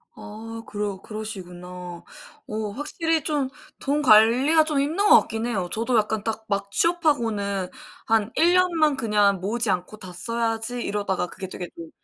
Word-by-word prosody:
아 225 Hz, +2 st, -9 dB
그러 205 Hz, -2 st, -4 dB
그러시구나. 180 Hz, -5 st, -8 dB, 0.4 s
어 215 Hz, 0 st, -3 dB
확실히 320 Hz, +2 st, -1 dB
좀 290 Hz, -4 st, 0 dB, 0.3 s
돈 290 Hz, +2 st, 0 dB
관리가 255 Hz, +6 st, +5 dB
좀 305 Hz, -2 st, 0 dB
힘든 330 Hz, +9 st, +1 dB
것 -, -, +9 dB
같긴 225 Hz, +1 st, -4 dB
해요. 190 Hz, -7 st, -2 dB
저도 230 Hz, +2 st, +1 dB
약간 215 Hz, 0 st, 0 dB
딱 220 Hz, 0 st, -4 dB
막 200 Hz, -1 st, -2 dB
취업하고는 225 Hz, -, +1 dB, 0.4 s
'한 220 Hz, 0 st, +1 dB
1 345 Hz, +2 st, +4 dB
년만 335 Hz, -5 st, +3 dB
그냥 210 Hz, -5 st, +2 dB
모으지 225 Hz, +3 st, +2 dB
않고 180 Hz, +4 st, -3 dB
다 185 Hz, -3 st, -9 dB
써야지.' 230 Hz, +4 st, -1 dB
이러다가 190 Hz, -3 st, -2 dB
그게 190 Hz, +2 st, -7 dB
되게 180 Hz, -1 st, -7 dB
좀 165 Hz, -1 st, -9 dB
220 Hz, 295 characters per minute, -24 LUFS, 200-275 Hz, 0.4 s, 것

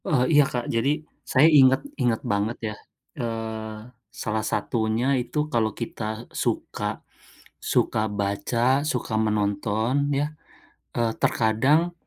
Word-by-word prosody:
Oh 135 Hz, -5 st, +2 dB
iya 145 Hz, 0 st, +7 dB
Kak, 120 Hz, -1 st, -3 dB
jadi, 115 Hz, +4 st, +2 dB, 0.4 s
saya 130 Hz, +3 st, +6 dB
inget 135 Hz, 0 st, +6 dB, 0.2 s
inget 120 Hz, -3 st, +1 dB
banget 105 Hz, +3 st, 0 dB, 0.2 s
ya, -, -, -11 dB, 0.5 s
eee, 110 Hz, -2 st, -4 dB, 0.3 s
salah 110 Hz, -1 st, -3 dB
satunya 110 Hz, +1 st, 0 dB, 0.2 s
itu 150 Hz, +4 st, -2 dB
kalau 110 Hz, -2 st, +2 dB
kita 110 Hz, -1 st, -5 dB
suka -, -, -2 dB, 0.7 s
suka 110 Hz, -, +2 dB, 0.2 s
baca, 120 Hz, +7 st, +1 dB
suka 120 Hz, -3 st, -3 dB
menonton 105 Hz, +2 st, 0 dB, 0.2 s
ya, 140 Hz, +1 st, +1 dB, 0.7 s
eee, 115 Hz, -1 st, +1 dB
terkadang, 130 Hz, +10 st, +2 dB
115 Hz, 115 wpm, -25 LUFS, 110-130 Hz, 0.7 s, iya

